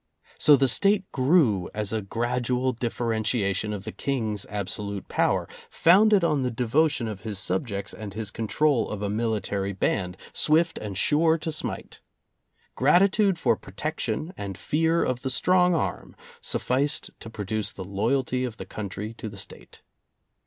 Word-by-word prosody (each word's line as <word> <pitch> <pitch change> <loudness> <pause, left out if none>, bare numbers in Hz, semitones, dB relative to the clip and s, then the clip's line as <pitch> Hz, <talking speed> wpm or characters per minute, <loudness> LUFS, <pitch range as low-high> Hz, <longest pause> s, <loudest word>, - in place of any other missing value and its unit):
So 150 - +7
the 135 0 +3
State 195 - +2
grew 130 - +3
as 105 0 -2
a 110 - 0
gradual 125 +4 -1
differentiation 110 -4 -1
of 100 -2 -5
the - - -5
King's 110 -7 -2
absolute 100 0 -4
power, - - +1 0.2
founded 200 +3 +5
on 150 -4 +2
the 125 - 0
devotion 125 +2 +1
of 105 -3 -6
his 110 -2 -5
subjects 100 +1 -2
and 105 -3 -8
his 110 -2 -3
control 130 +4 +1
of 105 -1 -4
a 100 - -1
military 105 -3 -1
band, 90 -1 -1 0.2
swift 165 +2 +2
and 100 -3 -6
sure 160 +7 +3
to 160 0 -3
smite. 155 - -5 0.7
Gratitude 190 - +4
for 140 - +2
protection 155 - -4
and 100 -2 -6
fear 160 - +1
of 125 -1 -1
the 135 - -2
strong 180 +6 +3
arm 160 - -3 0.3
sufficed 140 +4 -1
to 115 - -9
produce 110 -1 -3
the - - -7
loyalty 125 +6 0
of 120 -3 -4
the - - -7
country 105 +1 -6
to 110 - -5
the 100 - -11
State. 100 - -10
115 Hz, 150 wpm, -26 LUFS, 105-150 Hz, 0.7 s, So